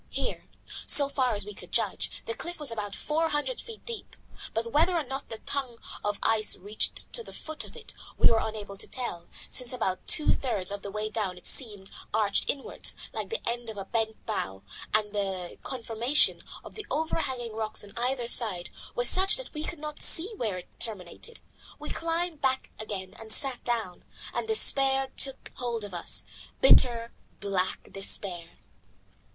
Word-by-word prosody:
Here, - - -3 0.4
so 285 -1 +7
far 260 -4 +1
as 205 -1 -1
we 210 - -7
could - - -11
judge, - - +1
the 460 - -2
cliff 350 -5 -5
was 295 -5 +3
about 205 -3 -4
four 320 +2 0
hundred 310 +13 -1
feet 455 -2 -11
deep. 470 -2 -7 0.4
But 230 +1 -2
whether 335 +6 +4
or 325 - +1
no 270 0 -4
the 225 - -6
tongue 260 -1 -3 0.3
of 205 -1 0
ice 220 -1 +4
reached 205 +3 0
to 470 - +1
the - - -11
foot 315 -1 -4
of - - -12
it - - -8 0.2
we - - +6
were 225 - +4
unable 210 -2 -5
to - - -2
tell, 235 -10 -4 0.2
since 250 -2 -1
about 190 -7 -2
two 305 - +4
thirds 205 -8 0
of 200 0 -4
the 200 - -6
way 210 +2 -3
down 205 -5 -1
it 180 - -8 0.7
arched 210 -2 +1
inwards, 275 - -1 0.2
like - - -4
the 460 - -4
end 235 0 -2
of 220 - -7
a 195 - -4
bent 220 0 -2
bow, 95 - -3 0.3
and 215 -1 +1
the 190 -3 -3
conformation 240 +3 +3 0.2
of - - -11
the 430 - -8
overhanging 265 -7 -2
rocks 220 -1 0
on 200 - -12
either 245 0 -1
side 205 -8 +3 0.2
was - - +4
such 380 +1 +6
that - - -8
we 305 -1 -4
could 340 - -4
not 300 0 -6
see 375 +7 +7
where 215 - -2
it 180 - -12
terminated. 220 - -3 0.4
We - - -6
climbed 330 -1 -2
back 265 -1 0
again 195 -3 -5
and 220 -1 -10
sat 265 0 +4
down, 225 -7 -2 0.3
and - - -2
despair 270 -11 +3
took 270 -1 -1
hold 235 -3 -2
of 205 -2 -8
us, 175 - +2 0.4
bitter, 235 - +5 0.3
black 195 -2 -2
despair. 185 -3 -4
235 Hz, 180 wpm, -29 LUFS, 205-290 Hz, 0.7 s, so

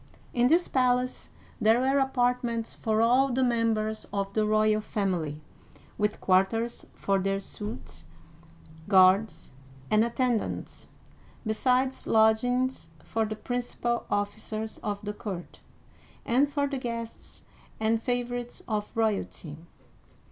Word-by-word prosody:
In 240 0 +3
this 335 +6 +4
palace 255 -1 +1 0.3
there 220 +2 +4
were 270 +2 +2
apartments 245 -3 0
for 220 0 +1
all 255 +3 +4
the 260 +2 +1
mem 230 -2 +2
bers 215 0 -3
of 200 -1 -2
the 215 0 +1
royal 215 0 +3
family, 175 -8 -2 0.5
with 210 0 -1
quarters 195 +5 +1
for 195 -1 +1
their 195 +1 0
suites, 210 +2 -7 0.8
guards, 190 -4 +4 0.4
and 215 +1 +5
attendants, 235 -1 -2 0.6
besides 255 +4 +1
lodgings 225 0 +2
for 225 -1 -1
the 215 0 -4
principal 240 0 -2
officers 215 +2 -3
of 205 -1 -3
the 210 0 -3
court, 190 -4 -7 0.7
and 270 +5 +2
for 285 -1 +1
the 275 -1 -3
guests 230 -2 -6 0.4
and 220 +1 +1
favorites 245 0 -3
of 210 -2 -2
royalty. 210 -8 -1
225 Hz, 120 wpm, -28 LUFS, 210-245 Hz, 0.8 s, and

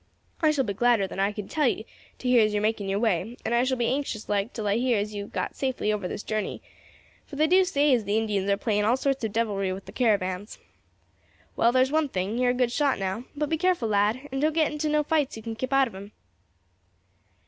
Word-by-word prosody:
I 310 - +4
shall 295 -3 +2
be 205 -5 -3
gladder 235 -1 +3
than 190 - -7
I 200 +1 +2
can 210 -1 -7
tell 300 -4 +1
you 220 - -1 0.3
to 255 - -5
hear 245 -2 +5
as 215 0 +1
you're 210 - +1
making 215 -2 -1
your 195 - 0
way, 220 +1 0
and 235 - 0
I 240 +1 +3
shall 260 0 0
be 240 - 0
anxious 260 -4 -2
like 205 +3 0
till 220 - -5
I 205 +2 +2
hear 245 -1 +2
as 210 +1 -2
you 205 - -4
have - - -15
got - - -3
safely 260 -5 -1
over 205 -3 -2
this 205 - -5
journey, 215 -1 -3 0.7
for 285 - -9
they 305 +2 +3
do 370 +4 +5
say 295 -6 +2
as 240 -3 +2
the 205 +2 0
Indians 205 -3 0
are 200 - +3
playing 210 -2 0
all 235 +5 +3
sorts 270 -1 -1
of 220 - -1
devilry 200 -4 -1
with 190 +1 -6
the - - -10
caravans. 205 -4 0 1.0
Well, 235 - +3
there's 260 +2 +3
one 310 -1 +1
thing, 195 +3 -2
you 250 - +2
are - - +4
a - - +3
good 250 -1 +1
shot 280 +1 +1
now; 195 +5 -3
but 300 +1 -1
be 320 - 0
careful, 355 -10 +1
lad, 215 +7 +1
and 270 +1 -2
don't 310 +1 +2
get 315 -1 +2
into 300 +1 -2
no 300 0 +2
fights 300 -3 0
if - - -7
you 220 - -9
can 225 0 -5
keep 255 +4 -4
out 270 -1 +4
of 230 - -11
'em." 200 +2 -10
230 Hz, 260 wpm, -26 LUFS, 205-270 Hz, 1.0 s, hear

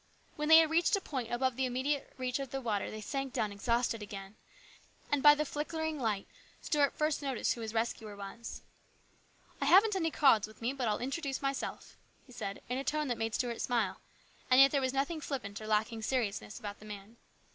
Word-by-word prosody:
When 300 +1 -2
they 320 - +10
had 320 -1 +5
reached 340 +5 +4
a - - 0
point 260 -10 -4
above 255 +1 +1
the 260 0 0
immediate 265 +3 -2
reach 255 0 -2
of 275 -2 -4
the 270 - -3
water 220 -6 -1
they 215 - -7
sank 270 +3 -3
down 210 -1 0
exhausted 230 +2 0
again, 200 -1 -8 0.8
and 290 -1 +2
by 295 +1 +9
the 300 +1 -1
flickering 315 +1 -3
light 215 -5 -1 0.3
Stuart 290 -3 +1
first 305 -1 +1
noticed 270 -3 0
who 235 - -8
his 220 -1 -4
rescuer 225 -2 -2
was. 200 +4 -8 0.5
" - - -31
I - - +1
haven't 390 +7 +6
any 330 -4 +1
cards 250 -9 +4
with 215 - -16
me, 235 +3 -1
but 260 -4 -2
I'll 210 - +1
introduce 275 +2 -3
myself," 275 0 -3 0.3
he 255 - -17
said 200 -5 -6
in 250 +2 -2
a - - -3
tone 300 0 -1
that 240 - -1
made 225 0 -1
Stuart 240 -2 -2
smile, 230 -6 0 0.5
and 255 0 +6
yet 275 0 +8
there 280 - +2
was 260 -1 +1
nothing 280 +4 -1
flippant 220 -9 -5
or 215 - -7
lacking 220 +1 +1
in - - -7
seriousness 220 -4 -2
about 205 -1 -7
the 215 - -13
man. 210 +2 -9
255 Hz, 215 wpm, -32 LUFS, 220-285 Hz, 0.8 s, they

